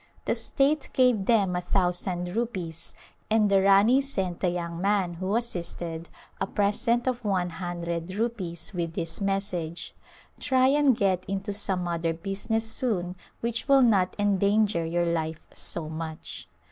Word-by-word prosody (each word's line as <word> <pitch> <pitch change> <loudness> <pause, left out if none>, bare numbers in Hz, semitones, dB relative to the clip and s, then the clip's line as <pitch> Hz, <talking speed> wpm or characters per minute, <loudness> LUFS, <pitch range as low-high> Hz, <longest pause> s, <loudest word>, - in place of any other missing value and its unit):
The - - +2
state 280 +2 +2
gave 250 -6 +3
them 200 -6 +3
a 180 - 0
thousand 180 0 -1
rupees 180 -8 -4 0.3
and 215 -2 +3
the 195 -1 +5
Rani 200 +7 +5
sent 190 -10 -2
the 185 - +1
young 170 -1 -4
man 195 -3 +1
who 185 +4 -2
assisted 170 -7 -3 0.3
a - - -1
present 220 +5 +1
of 250 -2 -1
one 185 -4 0
hundred 170 0 -4
rupees 200 -7 -3
with 170 -2 -3
this 165 +3 -3
message, 190 -4 -2 0.2
" - - -24
Try 260 -1 +3
and 280 -4 +4
get 185 -2 +1
into 195 +1 -3
some 190 -3 0
other 165 -1 -1
business 205 +5 -2
soon 205 -7 -1 0.3
which 235 +2 -2
will 275 -2 +6
not 195 -6 +3
endanger 205 -2 +2
your 170 +1 0
life 160 -2 -2
so 165 -3 -4
much." 160 0 -6
190 Hz, 150 wpm, -27 LUFS, 170-220 Hz, 0.3 s, will